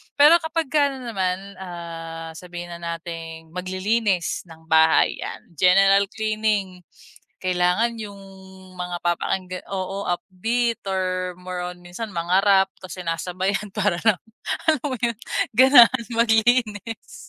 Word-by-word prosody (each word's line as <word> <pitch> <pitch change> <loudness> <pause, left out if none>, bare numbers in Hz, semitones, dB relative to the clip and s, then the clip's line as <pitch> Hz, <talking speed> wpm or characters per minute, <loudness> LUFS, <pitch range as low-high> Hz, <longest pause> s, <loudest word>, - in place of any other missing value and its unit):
Pero 300 +4 +7
kapag 320 -3 -3
ka 290 -1 +4
ano 250 -3 -6
naman, 190 0 -3
ah, 165 -2 -7
sabihin 175 -1 -8
na 170 - -7
nating 165 -1 -7
maglilinis 185 +1 -1
ng 160 -1 -14
bahay 160 0 +4
yan, - - -6 0.2
general 195 +2 +5
cleaning, 215 -3 -1 0.6
kailangan 185 +6 +1
yung 205 -2 -7 0.6
mga 180 0 -3
papakinggan 180 +1 -2
oo 195 +1 -3
upbeat 220 +7 -1
or 185 -1 -1
more 180 0 -5
on 180 0 -7
minsan 180 +6 -7
mga 175 +2 +1
Rap 195 -1 +5
kasi 185 0 -7
sinasabayan 185 +5 -2
para 205 -4 +1 0.7
alam 310 -5 +3
mo 260 -3 -2
yun 235 -1 +1 0.4
ganahan 255 -1 +7
maglinis. 225 -1 +1
190 Hz, 120 wpm, -23 LUFS, 175-220 Hz, 0.7 s, Pero